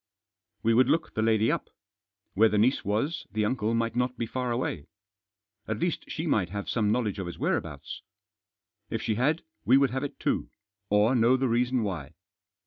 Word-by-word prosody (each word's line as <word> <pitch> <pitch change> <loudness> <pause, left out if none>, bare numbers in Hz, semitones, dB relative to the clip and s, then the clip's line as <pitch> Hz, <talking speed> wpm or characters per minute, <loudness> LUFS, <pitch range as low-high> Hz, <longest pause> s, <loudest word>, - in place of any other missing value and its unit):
We 115 - +3
would 125 +2 +4
look 160 +3 +1
the 110 - -1
lady 110 0 +3
up. - - -3 0.6
Where 110 +3 +5
the 105 - 0
niece 120 +6 +3
was 110 - -1
the 105 +1 0
uncle 110 -1 0
might 115 0 -1
not 125 0 0
be 115 - -1
far 125 +1 -3
away. 115 - -2 0.8
At 110 - -2
least 175 +8 -1
she 160 - -3
might 105 - +1
have 100 +2 -5
some 105 -3 +1
knowledge 110 -4 0
of 95 - -4
his 85 - -7
whereabouts. - - -3 0.9
If - - -3
she 110 - 0
had 140 +9 +1 0.2
we 130 - +5
would 140 -3 +3
have 130 +2 -2
it 145 - -6
too, - - -1 0.4
or 105 +4 +4
know 120 +1 +4
the 130 0 +1
reason 120 +1 +1
why. 85 -9 -4
115 Hz, 190 wpm, -28 LUFS, 105-130 Hz, 0.9 s, Where